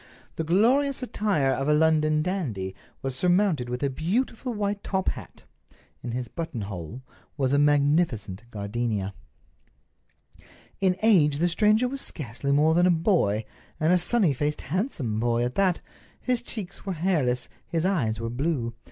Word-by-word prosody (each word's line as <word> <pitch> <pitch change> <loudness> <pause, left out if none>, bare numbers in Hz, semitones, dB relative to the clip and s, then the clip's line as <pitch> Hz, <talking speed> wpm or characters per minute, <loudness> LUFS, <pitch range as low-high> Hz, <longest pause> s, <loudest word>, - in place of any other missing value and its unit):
The 160 - -2
glorious 255 - +2
attire 200 - +1
of 135 +1 -1
a 150 - +5
London 155 -1 +3
dandy 125 - -3 0.3
was 135 -1 -3
surmounted 175 -5 +2
with 125 +2 -3
a 140 - +2
beautiful 225 - -1
white 205 -2 -2
top 190 -1 0
hat. - - -9 0.6
In 120 - -5
his 125 +1 -3
buttonhole 110 - -6 0.3
was 135 -2 +1
a 140 - +4
magnificent 145 - +2
gardenia. 105 -2 -2 1.7
In 185 -2 +2
age 160 -10 +5
the 170 +4 +2
stranger 215 +7 +3
was 275 +2 -4
scarcely 140 -1 -4
more 150 +3 +4
than 175 +2 +4
a - - +4
boy, 160 - +2 0.3
and 160 +2 +3
a 180 - +4
sunny 185 -4 +2
faced, 150 +3 -2
handsome 140 - -2
boy 120 0 +1
at 125 +1 -2
that. 190 -3 +1 0.4
His 250 -2 0
cheeks 200 -6 -6
were 195 - -3
hairless, 155 -8 0 0.2
his 165 0 -1
eyes 125 - 0
were 115 0 -3
blue. 125 -2 -1
155 Hz, 150 wpm, -26 LUFS, 125-190 Hz, 1.7 s, a